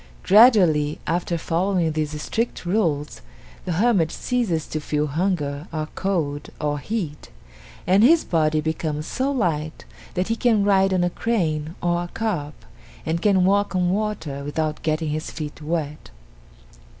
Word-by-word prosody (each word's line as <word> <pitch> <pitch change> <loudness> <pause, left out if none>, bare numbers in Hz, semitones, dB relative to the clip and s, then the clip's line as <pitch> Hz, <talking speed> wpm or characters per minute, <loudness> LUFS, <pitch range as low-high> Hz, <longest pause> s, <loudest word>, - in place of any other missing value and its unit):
Gradually 185 - +5
after 170 +1 -1
following 170 0 0
these 155 -1 -3
strict 230 +5 -3
rules, 165 -7 -1 0.4
the 180 - -1
hermit 185 -4 +2
ceases 220 -11 -1
to 155 - -4
feel 150 0 -1
hunger 150 -1 -2
or 155 -1 -3
cold 160 -7 -2
or 145 -1 -1
heat, 170 -5 -4 0.6
and 190 +3 +4
his 320 +6 +6
body 155 -2 +1
becomes 155 -1 -2
so 265 +8 -1
light 160 - -2 0.3
that 180 +3 -1
he 225 - +1
can 230 -3 +2
ride 195 -1 +3
on 185 -1 +2
a 175 - 0
crane 165 -8 -1
or 175 0 +1
a 175 - -4
carp, 175 -8 -3 0.5
and 165 +1 -1
can 190 -2 +3
walk 200 +1 +2
on 180 -1 +2
water 185 -9 -2
without 150 +1 -2
getting 155 0 -1
his 155 +2 -3
feet 150 -1 -7
wet. 150 - -3
170 Hz, 150 wpm, -23 LUFS, 155-195 Hz, 0.6 s, his